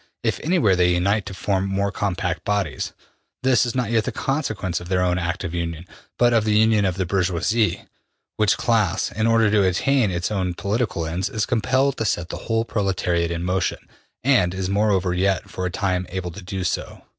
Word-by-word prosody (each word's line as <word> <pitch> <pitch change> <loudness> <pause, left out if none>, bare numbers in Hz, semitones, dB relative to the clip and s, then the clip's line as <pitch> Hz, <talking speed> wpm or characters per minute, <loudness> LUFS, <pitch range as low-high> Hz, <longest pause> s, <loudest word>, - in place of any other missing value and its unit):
If - - 0
anywhere 155 - +3
they 90 0 +3
unite 100 +4 +1
to - - -6
form 95 0 0
more 100 +1 0
compact 100 -2 -2
bodies, 100 -7 -1 0.5
this 130 -2 +3
is 120 - -4
not 125 -3 -1
yet 115 -2 +2
the - - -2
consequence 110 - -2
of 90 0 -10
their 90 -1 +2
own 90 0 +1
active 85 0 -3
union, 85 -1 -3 0.3
but 120 -1 +4
of 115 -2 +3
the 105 -1 +2
union 110 -1 +4
of 95 -2 0
the 95 - 0
bourgeoisie, 95 +4 0 0.5
which 110 -1 +2
class, 105 -6 +1
in 110 +1 0
order 115 -2 +4
to 105 -1 +4
attain 110 +6 +2
its 90 +2 -2
own 95 -4 -1
political 100 -3 -1
ends, 85 +4 -2
is 110 -1 -1
compelled 130 +3 +1
to 115 - -1
set 85 -4 -1
the - - -5
whole 115 0 +1
proletariat 90 -5 0
in 85 0 -3
motion, 90 +1 0 0.5
and 110 -10 +3
is 95 0 -2
moreover 100 -3 +2
yet, 95 +1 0
for 90 0 -3
a - - -2
time, 90 -1 -1
able 90 -1 -4
to 100 - -9
do 95 +1 -4
so.'' 90 - -3
95 Hz, 200 wpm, -22 LUFS, 90-110 Hz, 0.5 s, but